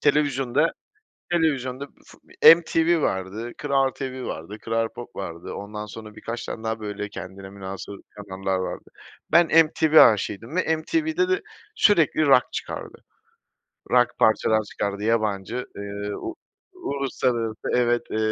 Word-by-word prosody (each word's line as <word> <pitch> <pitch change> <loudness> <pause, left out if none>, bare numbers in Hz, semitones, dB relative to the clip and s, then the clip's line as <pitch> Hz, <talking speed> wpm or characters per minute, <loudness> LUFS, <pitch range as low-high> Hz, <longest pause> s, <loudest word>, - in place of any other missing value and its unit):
Televizyonda 145 0 +2 0.6
televizyonda 140 -5 0 0.2
fut - - -18 0.3
MTV 165 0 +1
vardı, 100 +3 -2
KRAL 135 -2 +1
TV 130 -1 -6
vardı, 85 +7 -6
KRAL 115 0 0
POP 120 +1 -11
vardı, 85 -3 -6
ondan 105 +1 -6
sonra 105 0 -10
birkaç 115 +1 -6
tane 110 - -6
daha 110 0 -2
böyle 105 -1 -5
kendine 95 0 -9
münhasır 95 0 -7 0.2
kanallar 95 -2 -3
vardı. 95 - -5 0.4
Ben 170 -1 +6 0.2
MTV 155 0 0
aşığıydım 110 - +3
ve 165 -3 +2
MTV'de 320 - 0
de 380 +2 +1 0.3
sürekli 165 -6 +4
rock 135 -3 +6
çıkardı, - - -6 0.9
rock 125 -1 +3
parçalar 110 0 +3
çıkardı. 100 -1 -4
Yabancı, 110 +1 -1
eee, 100 0 -5
u 345 - -6 0.4
uluslararası. 130 - -2 0.2
Evet, 120 -1 +2
eee, - - -2
120 Hz, 130 wpm, -24 LUFS, 105-145 Hz, 0.9 s, Ben